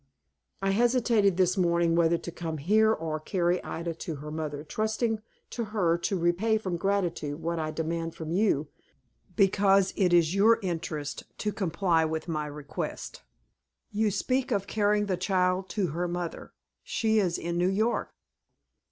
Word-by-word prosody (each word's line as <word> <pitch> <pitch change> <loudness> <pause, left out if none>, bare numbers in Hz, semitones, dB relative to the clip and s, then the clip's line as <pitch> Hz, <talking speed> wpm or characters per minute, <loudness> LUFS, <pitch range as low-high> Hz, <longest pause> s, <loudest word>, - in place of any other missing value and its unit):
I 195 - +2
hesitated 230 -3 +3
this 185 -1 +3
morning 170 -2 +2
whether 170 0 +3
to 170 - -7
come 165 -2 -4
here, 215 +9 +3
or 160 -6 -2
carry 175 +1 0
Ida 170 0 -4
to 165 0 -6
her 150 +2 -8
mother, 150 -2 -4
trusting 220 +5 -1 0.3
to 235 - -3
her 190 -6 +1
to 195 +3 -1
repay 180 +6 +2
from 185 -5 -3
gratitude 170 -6 -1
what 165 +1 -2
I 155 -1 -2
demand 165 +1 -3
from 160 -1 -6
you, 175 -6 +2 0.7
because 195 -1 +4
it 185 -3 +2
is 170 -1 +4
your 220 +4 +5
interest 160 -5 -4
to 210 - -1
comply 175 -3 +1
with 160 +1 -2
my 155 -3 -2
request." 145 -1 -6 0.7
"You 215 +1 +1
speak 255 +6 0
of 200 -3 +1
carrying 210 0 +1
the 190 -3 -1
child 185 0 +1
to 190 -4 +1
her 175 +4 -2
mother. 175 -1 -5 0.3
She 220 -1 +1
is 180 -4 +1
in 170 +1 -3
New 180 +1 +3
York." 220 +5 0
180 Hz, 160 wpm, -28 LUFS, 165-205 Hz, 0.7 s, your